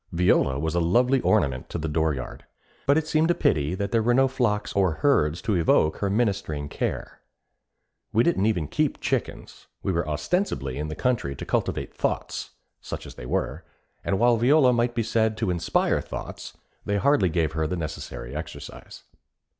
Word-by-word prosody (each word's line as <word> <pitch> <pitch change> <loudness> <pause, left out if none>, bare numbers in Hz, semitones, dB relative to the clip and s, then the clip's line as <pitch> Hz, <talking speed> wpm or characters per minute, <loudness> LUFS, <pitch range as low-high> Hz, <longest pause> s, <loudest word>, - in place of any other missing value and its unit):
Viola 85 -6 +2
was 80 +2 -2
a 85 - +2
lovely 125 +10 +3
ornament 70 -12 +1
to - - -4
the 80 0 -3
dooryard; 75 -4 -2 0.4
but 140 +2 +5
it 160 - +1
seemed 155 +1 +2
a 175 - +3
pity 75 +3 +1
that 100 +1 -3
there 115 - +3
were 120 +2 +2
no 135 +1 +5
flocks 120 -6 -1
or 95 -4 +2
herds 80 - +1
to 110 - 0
evoke 80 -3 +3
her 100 - -1
ministering 100 -9 -1
care. - - -4 0.9
We 115 - +3
didn't 110 - +2
even 85 -9 0
keep - - 0
chickens; - - -3 0.2
we - - 0
were 85 -3 -1
ostensibly 75 - -1
in 75 - -3
the 75 - -5
country 110 - -1
to - - -7
cultivate - - -2
thoughts, - - -2 0.3
such - - -6
as - - -9
they 60 - -9
were, - - -2 0.4
and 95 - 0
while 120 +1 +4
Viola 130 +2 +5
might 120 0 +1
be 115 - +1
said 110 0 +1
to 110 -5 0
inspire 85 -2 +1
thoughts, - - -8 0.3
they 100 0 0
hardly 120 -5 +3
gave 80 -2 0
her 80 -1 -1
the 90 - -3
necessary 75 -5 -6
exercise. 80 - -8
95 Hz, 180 wpm, -25 LUFS, 80-120 Hz, 0.9 s, but